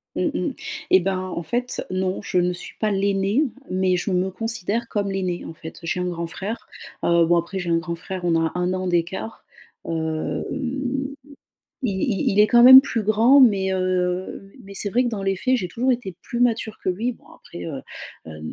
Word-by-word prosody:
Mmh -, -, +1 dB
mmh. -, -, -2 dB, 0.4 s
Et 190 Hz, -, +6 dB
ben, 185 Hz, +1 st, -1 dB
en 185 Hz, -2 st, -4 dB
fait, 245 Hz, +9 st, -2 dB
non, 185 Hz, +1 st, -1 dB
je 180 Hz, -, -1 dB
ne 180 Hz, 0 st, +1 dB
suis 175 Hz, -, -10 dB
pas 215 Hz, -, +1 dB
l'aînée 200 Hz, +6 st, +1 dB, 0.3 s
mais 185 Hz, 0 st, +1 dB
je 180 Hz, +3 st, -2 dB
me 185 Hz, +1 st, 0 dB
considère 225 Hz, +2 st, -2 dB
comme 200 Hz, -2 st, -2 dB
l'aînée, 185 Hz, -2 st, -2 dB
en -, -, -7 dB
fait. 160 Hz, 0 st, -10 dB
J'ai 165 Hz, +2 st, -2 dB
un 180 Hz, -, -1 dB
grand 170 Hz, -1 st, -3 dB
frère, 205 Hz, +7 st, -6 dB, 0.4 s
heu 170 Hz, -1 st, +4 dB
bon 175 Hz, +1 st, +3 dB
après, 170 Hz, +3 st, -2 dB
j'ai 180 Hz, -, -4 dB
un 165 Hz, -, +3 dB
grand-frère, 175 Hz, +2 st, -5 dB
on 170 Hz, -1 st, +2 dB
a 160 Hz, -, 0 dB
1 180 Hz, +1 st, 0 dB
an 185 Hz, 0 st, -2 dB
d'écart. 175 Hz, +5 st, -2 dB, 0.4 s
Hem, 160 Hz, -1 st, -2 dB, 1.4 s
i 200 Hz, -, 0 dB
i 195 Hz, +1 st, 0 dB
il 205 Hz, -, +4 dB
est 210 Hz, -, +7 dB
quand 240 Hz, +1 st, +5 dB
même 260 Hz, +1 st, +12 dB
plus 240 Hz, -5 st, -2 dB
grand 225 Hz, +7 st, +5 dB
mais, 195 Hz, -6 st, +4 dB
heu, 185 Hz, 0 st, -1 dB
mai -, -, -18 dB
mais 200 Hz, 0 st, -11 dB
c'est 205 Hz, -, +1 dB
vrai 245 Hz, +5 st, +2 dB
que -, -, +1 dB
dans 205 Hz, -3 st, -4 dB
les 195 Hz, 0 st, 0 dB
faits, 255 Hz, +7 st, +1 dB
j'ai 180 Hz, -6 st, -3 dB
toujours 250 Hz, +7 st, +1 dB
été 195 Hz, -8 st, -4 dB
plus 240 Hz, -2 st, -4 dB
mature 225 Hz, -2 st, +1 dB
que -, -, -2 dB
lui 225 Hz, +7 st, -1 dB
bon -, -, -21 dB
après, 170 Hz, -, -10 dB
heu, 140 Hz, -5 st, -5 dB, 0.5 s
hem 80 Hz, 0 st, -7 dB
190 Hz, 210 wpm, -23 LUFS, 175-220 Hz, 1.4 s, même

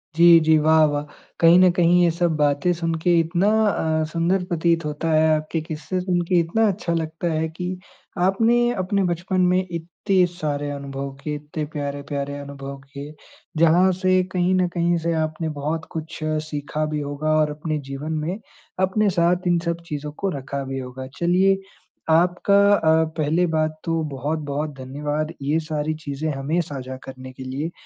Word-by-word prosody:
जी, 170 Hz, 0 st, +8 dB
जी। 160 Hz, 0 st, +4 dB
वाह 155 Hz, +1 st, +4 dB
वाह! 145 Hz, -1 st, -1 dB, 0.4 s
कहीं 170 Hz, +1 st, +7 dB
न 185 Hz, -1 st, +7 dB
कहीं 175 Hz, 0 st, +4 dB
ये 170 Hz, -, +4 dB
सब 170 Hz, -1 st, 0 dB
बातें 145 Hz, +3 st, +2 dB
सुनके 165 Hz, 0 st, +1 dB
इतना 170 Hz, +4 st, +1 dB, 0.5 s
अ, -, -, +1 dB
सुंदर 175 Hz, +3 st, +1 dB
प्रतीत 170 Hz, -1 st, +1 dB
होता 150 Hz, +2 st, -2 dB
है, 155 Hz, 0 st, +4 dB
आपके 155 Hz, +1 st, -2 dB
किस्से 160 Hz, +3 st, -4 dB
सुनके 180 Hz, -1 st, 0 dB
इतना 210 Hz, +7 st, +2 dB
अच्छा 180 Hz, -3 st, -1 dB
लगता 165 Hz, +1 st, -2 dB
है 160 Hz, 0 st, 0 dB
कि 180 Hz, +3 st, -5 dB, 0.5 s
आपने 235 Hz, +5 st, +3 dB
अपने 200 Hz, +1 st, 0 dB
बचपन 180 Hz, +2 st, -1 dB
में 180 Hz, +1 st, +2 dB
इत्ते 175 Hz, +3 st, 0 dB
सारे 145 Hz, -3 st, -2 dB
अनुभव 140 Hz, -1 st, -5 dB
किए, 150 Hz, -1 st, -2 dB
इतने 150 Hz, +1 st, -5 dB
प्यारे-प्यारे 145 Hz, 0 st, -4 dB
अनुभव 140 Hz, -1 st, -8 dB, 0.2 s
किए, 145 Hz, +2 st, -7 dB, 0.4 s
जहाँ 170 Hz, +3 st, +5 dB
से 185 Hz, -1 st, +4 dB
कहीं 180 Hz, 0 st, +1 dB
न 180 Hz, -1 st, +2 dB
कहीं 170 Hz, 0 st, +2 dB
से 170 Hz, +1 st, -1 dB
आपने 155 Hz, +1 st, -3 dB
बहुत 160 Hz, +3 st, -2 dB
कुछ 160 Hz, -1 st, -6 dB, 0.3 s
सीखा 150 Hz, +1 st, -3 dB
भी 150 Hz, -, -1 dB
होगा 145 Hz, +2 st, -2 dB
और 150 Hz, -1 st, +2 dB
अपने 155 Hz, +1 st, -3 dB
जीवन 145 Hz, +3 st, -5 dB
में 180 Hz, +5 st, -2 dB, 0.4 s
अपने 200 Hz, +2 st, +2 dB
साथ 175 Hz, +1 st, +1 dB
इन 175 Hz, -1 st, +3 dB
सब 170 Hz, 0 st, -2 dB
चीज़ों 150 Hz, 0 st, -5 dB
को 195 Hz, +6 st, -3 dB
रखा 140 Hz, +1 st, -4 dB
भी 135 Hz, 0 st, -4 dB
होगा। 130 Hz, +1 st, -7 dB
चलिए 185 Hz, +3 st, +3 dB, 0.5 s
आपका 180 Hz, +4 st, +3 dB, 0.2 s
अ, 160 Hz, -2 st, +3 dB
पहले 160 Hz, +4 st, +2 dB
बात 155 Hz, 0 st, 0 dB
तो 165 Hz, -1 st, 0 dB
बहुत-बहुत 145 Hz, +1 st, -3 dB
धन्यवाद 150 Hz, +4 st, -3 dB
ये 150 Hz, +4 st, +1 dB
सारी 155 Hz, -1 st, -2 dB
चीज़ें 145 Hz, +2 st, -3 dB
हमें 140 Hz, +6 st, -1 dB
साझा 130 Hz, -4 st, -6 dB
करने 130 Hz, -1 st, -9 dB
के 130 Hz, -, -9 dB
लिए 140 Hz, +6 st, -4 dB
160 Hz, 170 wpm, -22 LUFS, 145-175 Hz, 0.5 s, जी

